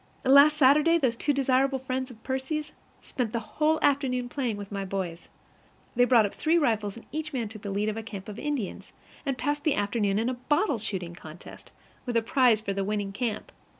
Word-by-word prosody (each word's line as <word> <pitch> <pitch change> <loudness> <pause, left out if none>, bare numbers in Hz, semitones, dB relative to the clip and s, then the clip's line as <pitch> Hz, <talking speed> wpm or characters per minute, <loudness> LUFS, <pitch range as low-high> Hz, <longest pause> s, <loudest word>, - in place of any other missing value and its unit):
Last 280 +3 +7
Saturday 300 +4 +5
those 260 -7 +1
two 290 - 0
desirable 270 0 +2
friends 260 0 -3
of 225 -3 -14
Percy's 290 +3 -3 0.3
spent 240 -4 -3
the 235 - 0
whole 310 +6 0
afternoon 260 -3 +1
playing 245 -6 -2
with 200 0 -8
my 200 -1 -3
boys. 185 -3 -5 0.7
They 245 +1 +5
brought 240 -4 +5
up 200 - -4
three 325 +2 +2
rifles, 220 -8 0
and 230 - -12
each 310 0 -4
man 235 -5 -2
took 215 -1 -10
the 200 - -5
lead 200 +2 -1
of 215 0 -2
a - - -3
camp 200 -3 -8
of 210 +1 -7
Indians, 285 -9 -4 0.3
and 270 -2 -1
passed 290 +4 -2
the 305 - +2
afternoon 205 -1 0
in 225 +2 0
a 255 - 0
bottle 290 - 0
shooting 180 -5 -4
contest, 160 0 -12 0.4
with 240 -1 +1
a 230 - +2
prize 245 -4 +3
for 200 -2 -3
the 195 0 -1
winning 205 0 -2
camp. 215 +1 -3
245 Hz, 210 wpm, -27 LUFS, 205-275 Hz, 0.7 s, Last